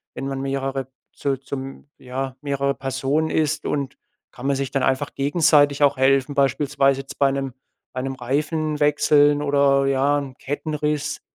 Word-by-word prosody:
wenn 135 Hz, -, -4 dB
man 135 Hz, -1 st, -3 dB
mehrere 135 Hz, -1 st, -2 dB, 0.3 s
zu 135 Hz, -2 st, -2 dB
zum 135 Hz, +1 st, -8 dB
ja, 130 Hz, +1 st, -5 dB
mehrere 140 Hz, -1 st, -1 dB
Personen 135 Hz, +4 st, -1 dB
ist, 155 Hz, -1 st, 0 dB
und 140 Hz, -2 st, -2 dB, 0.4 s
kann 125 Hz, -, -10 dB
man 140 Hz, -, +2 dB
sich 135 Hz, -1 st, -3 dB
dann 135 Hz, -2 st, 0 dB
einfach 135 Hz, +2 st, 0 dB
gegenseitig 145 Hz, -1 st, +3 dB
auch 140 Hz, -1 st, +4 dB
helfen, 135 Hz, +1 st, +2 dB
beispielsweise 140 Hz, 0 st, +2 dB
jetzt 135 Hz, -, -11 dB
bei 140 Hz, -1 st, +4 dB
'nem 135 Hz, -2 st, -3 dB, 0.4 s
bei 130 Hz, -, -3 dB
'nem 135 Hz, 0 st, -4 dB
Reifen 150 Hz, +4 st, -1 dB
wechseln 145 Hz, 0 st, +4 dB
oder 140 Hz, -1 st, +3 dB
ja 135 Hz, +2 st, +2 dB
'n 135 Hz, -2 st, -7 dB
Kettenriss 150 Hz, +1 st, -2 dB
140 Hz, 160 wpm, -22 LUFS, 135-145 Hz, 0.4 s, auch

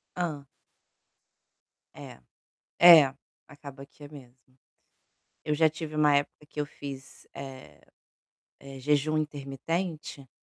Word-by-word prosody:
Hã? 160 Hz, -6 st, -4 dB, 1.5 s
É, -, -, -12 dB, 0.6 s
é, 160 Hz, -6 st, +8 dB, 0.3 s
acaba 140 Hz, -2 st, -12 dB
que 145 Hz, -, -19 dB
é -, -, -9 dB
mesmo. 130 Hz, -4 st, -14 dB, 1.1 s
Eu 150 Hz, -, 0 dB
já 160 Hz, +1 st, +4 dB
tive 155 Hz, 0 st, -7 dB
uma 150 Hz, -1 st, +4 dB
época 145 Hz, +1 st, -2 dB
que 150 Hz, -, -9 dB
eu -, -, -3 dB
fiz, 135 Hz, -2 st, -11 dB
eh 135 Hz, -1 st, -11 dB, 0.8 s
eh, 135 Hz, -1 st, -11 dB
jejum 150 Hz, +3 st, +1 dB
intermitente, 150 Hz, +1 st, -4 dB
145 Hz, 110 wpm, -27 LUFS, 135-155 Hz, 1.5 s, é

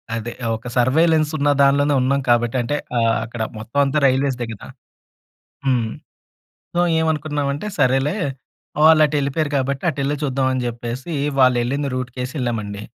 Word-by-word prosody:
అదే 115 Hz, +1 st, -4 dB, 0.2 s
ఒక 115 Hz, +2 st, -9 dB
సర్వేలెన్స్ 155 Hz, +5 st, +3 dB
ఉన్న 145 Hz, +1 st, +1 dB
దాంట్లోనే 145 Hz, +1 st, +4 dB
ఉన్నాం 140 Hz, +2 st, +1 dB
కాబట్టి 120 Hz, +1 st, +2 dB
అంటే 120 Hz, +5 st, -2 dB, 0.2 s
ఆహ్, 115 Hz, -1 st, +2 dB
అక్కడ 115 Hz, 0 st, -7 dB, 0.2 s
మొత్తం 110 Hz, +6 st, -3 dB
అంతా 140 Hz, +2 st, +1 dB
రైల్వేస్‌దే 130 Hz, -2 st, +1 dB
కదా! 100 Hz, -, -11 dB, 1.0 s
హ్మ్. 125 Hz, -4 st, +1 dB, 0.9 s
సో, 175 Hz, -, 0 dB, 0.2 s
ఏమనుకున్నామంటే 150 Hz, +1 st, -1 dB
సరేలే 135 Hz, +7 st, +2 dB, 0.7 s
వాళ్ళు 160 Hz, 0 st, +7 dB
అటెళ్ళిపోయారు 145 Hz, +1 st, -1 dB
కాబట్టి, 135 Hz, +2 st, -2 dB
అటెళ్ళి 140 Hz, 0 st, -1 dB
చూద్దాం 135 Hz, -1 st, 0 dB
అని 130 Hz, -, -1 dB
చెప్పేసి 120 Hz, +6 st, -5 dB, 0.3 s
వాళ్ళు 130 Hz, -1 st, +5 dB
వెళ్ళింది 140 Hz, +3 st, -1 dB
రూట్‌కేసి 125 Hz, 0 st, -4 dB
ఎళ్ళామండి. 105 Hz, -4 st, -3 dB
135 Hz, 135 wpm, -20 LUFS, 120-145 Hz, 1.0 s, వాళ్ళు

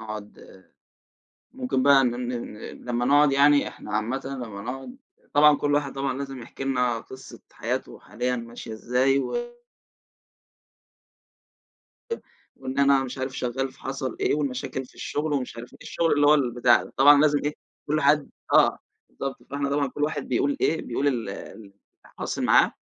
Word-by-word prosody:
نقعُد، 105 Hz, -3 st, -10 dB, 0.9 s
ممكن 130 Hz, 0 st, -1 dB
بقى 140 Hz, -1 st, +6 dB
ن 125 Hz, -, +2 dB
ن 120 Hz, 0 st, -3 dB
ن 105 Hz, -, -12 dB, 0.3 s
لمّا 120 Hz, 0 st, -1 dB
نقعُد 145 Hz, +2 st, +5 dB
يعني، 145 Hz, +1 st, +5 dB
إحنا 105 Hz, -, -10 dB
عامةً 120 Hz, +5 st, -1 dB
لمّا 120 Hz, -7 st, -6 dB
نقعُد 135 Hz, -, -6 dB, 0.4 s
طبعًا 150 Hz, 0 st, +7 dB
كلّ 145 Hz, 0 st, 0 dB
واحد 145 Hz, -2 st, 0 dB
طبعًا 135 Hz, -1 st, -2 dB
لازم 135 Hz, -3 st, -6 dB
يحكي 135 Hz, -, -8 dB
لنا 125 Hz, -3 st, +1 dB
قصة 130 Hz, +3 st, -12 dB
حياته -, -, -4 dB
حاليًا 125 Hz, +5 st, -3 dB
ماشية 115 Hz, -1 st, -8 dB
إزاي 125 Hz, +4 st, +1 dB
و 480 Hz, -, -3 dB, 2.6 s
أ 460 Hz, -, -2 dB, 0.4 s
وإن 130 Hz, +1 st, -4 dB
أنا 140 Hz, -1 st, +4 dB
مش 130 Hz, +1 st, -6 dB
عارف 130 Hz, 0 st, -4 dB
شغّال 130 Hz, +2 st, -2 dB
فحصَل 135 Hz, -2 st, -5 dB
إيه، -, -, +2 dB
والمشاكل 130 Hz, -2 st, -3 dB
في -, -, -22 dB
الشغل 150 Hz, +1 st, -2 dB
ومش 125 Hz, -4 st, -3 dB
عارف 120 Hz, +1 st, -9 dB
إيه، -, -, -16 dB
الشغل 165 Hz, -1 st, 0 dB
اللي 145 Hz, 0 st, +4 dB
هو 150 Hz, -, +7 dB
البتاع 120 Hz, -3 st, +3 dB
ده، -, -, -13 dB
طبعًا 145 Hz, +1 st, +7 dB
لازم 150 Hz, -1 st, +4 dB
إيه، 150 Hz, -, 0 dB, 0.3 s
كلّ 155 Hz, +1 st, +1 dB
حد 145 Hz, +1 st, +3 dB, 0.2 s
آه -, -, +5 dB, 0.3 s
بالضبط. 135 Hz, -1 st, -6 dB
فإحنا 140 Hz, 0 st, -2 dB
طبعًا 140 Hz, 0 st, +1 dB
كل 145 Hz, +3 st, -4 dB
واحد 155 Hz, -, -2 dB
بيقول 285 Hz, 0 st, 0 dB
إيه، 160 Hz, -, +2 dB
بيقول 135 Hz, +4 st, -1 dB
ال 120 Hz, -7 st, -1 dB
اللي 100 Hz, +1 st, -10 dB, 0.4 s
حاصِل -, -, -3 dB
معاه، -, -, +5 dB
135 Hz, 165 wpm, -25 LUFS, 120-145 Hz, 2.6 s, طبعًا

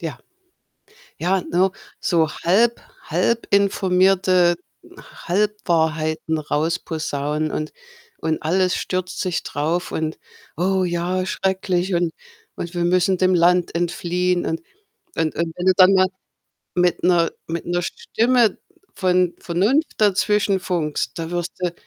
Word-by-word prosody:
Ja. -, -, -5 dB, 1.0 s
Ja, 185 Hz, +3 st, +1 dB
ne, 185 Hz, +2 st, +1 dB, 0.3 s
so 165 Hz, -3 st, +2 dB
halb 225 Hz, +7 st, +2 dB, 0.2 s
halb 235 Hz, 0 st, 0 dB
informierte 185 Hz, -2 st, +3 dB, 0.4 s
Halbwahrheiten 160 Hz, -5 st, -1 dB
rausposaunen 155 Hz, -1 st, -2 dB
und 155 Hz, 0 st, -3 dB, 0.5 s
und 160 Hz, -1 st, -2 dB
alles 185 Hz, +3 st, +2 dB
stürzt 185 Hz, 0 st, -3 dB
sich 180 Hz, -3 st, -1 dB
drauf 165 Hz, +5 st, -2 dB
und: 160 Hz, 0 st, -3 dB, 0.4 s
„Oh 190 Hz, +2 st, +1 dB
ja, 180 Hz, +1 st, -1 dB
schrecklich 190 Hz, -1 st, -1 dB
und 170 Hz, -1 st, +1 dB, 0.4 s
und 170 Hz, +1 st, -6 dB
wir 175 Hz, -, 0 dB
müssen 180 Hz, +1 st, +2 dB
dem 185 Hz, 0 st, +3 dB
Land 175 Hz, 0 st, +3 dB
entfliehen.“ 175 Hz, +1 st, 0 dB
Und 330 Hz, -, -2 dB, 0.5 s
und 160 Hz, -2 st, -1 dB
und 165 Hz, +1 st, -2 dB
wenn 180 Hz, -, -4 dB
du 190 Hz, -, +5 dB
dann 190 Hz, 0 st, +7 dB
mal 185 Hz, -1 st, +4 dB, 0.7 s
mit 180 Hz, 0 st, +1 dB
'ner 175 Hz, -2 st, +3 dB, 0.2 s
mit 165 Hz, 0 st, -4 dB
'ner 175 Hz, +1 st, 0 dB
Stimme 230 Hz, +4 st, +1 dB, 0.4 s
von 180 Hz, -1 st, +2 dB
Vernunft 210 Hz, -, +1 dB
dazwischenfunkst, 190 Hz, -8 st, +1 dB
da 165 Hz, 0 st, -4 dB
wirst 175 Hz, -1 st, -3 dB
du 180 Hz, -2 st, -1 dB
180 Hz, 120 wpm, -21 LUFS, 170-190 Hz, 1.0 s, dann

